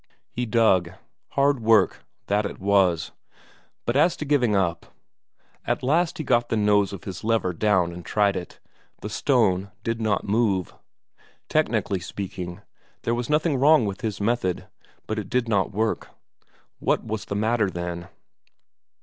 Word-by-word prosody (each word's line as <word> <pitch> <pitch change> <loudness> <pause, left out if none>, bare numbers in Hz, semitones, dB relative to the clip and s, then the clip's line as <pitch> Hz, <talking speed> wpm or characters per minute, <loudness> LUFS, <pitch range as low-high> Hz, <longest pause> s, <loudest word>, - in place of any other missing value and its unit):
He 125 0 -3
dug. 95 -6 +3 0.4
Hard 140 -1 +3
work, 110 -3 +3 0.2
that 105 +1 +1
it 100 - -5
was, 95 -4 +2 0.7
but 120 - 0
as 165 +5 +3
to 150 - -4
giving 130 -7 +2
up... 85 -4 0 0.8
At - - -1
last 170 +6 +1
he 155 - -3
got 120 -3 +2
the 115 - 0
nose 105 -2 +3
of 100 -3 -8
his 95 -3 -7
lever 110 -5 +1
down 95 -2 +2
and 85 0 -9
tried 100 0 +1
it; 90 - -7 0.4
the 105 - -6
stone 100 -6 +2
did 115 0 -2
not 105 -2 0
move. 100 -4 +1 0.8
Technically 95 - +1
speaking, 90 -1 -6 0.4
there 115 - 0
was 120 0 -3
nothing 150 -1 +2
wrong 145 -1 +5
with 100 +1 -4
his 110 -4 -3
method, 100 -4 0 0.4
but 110 0 -2
it 105 - -6
did 125 -1 0
not 100 -3 +1
work. 110 +2 -1 0.7
What - - +1
was 110 -1 -4
the 100 - -4
matter, 110 0 +1
then? 85 -1 -5
105 Hz, 155 wpm, -24 LUFS, 95-120 Hz, 0.8 s, wrong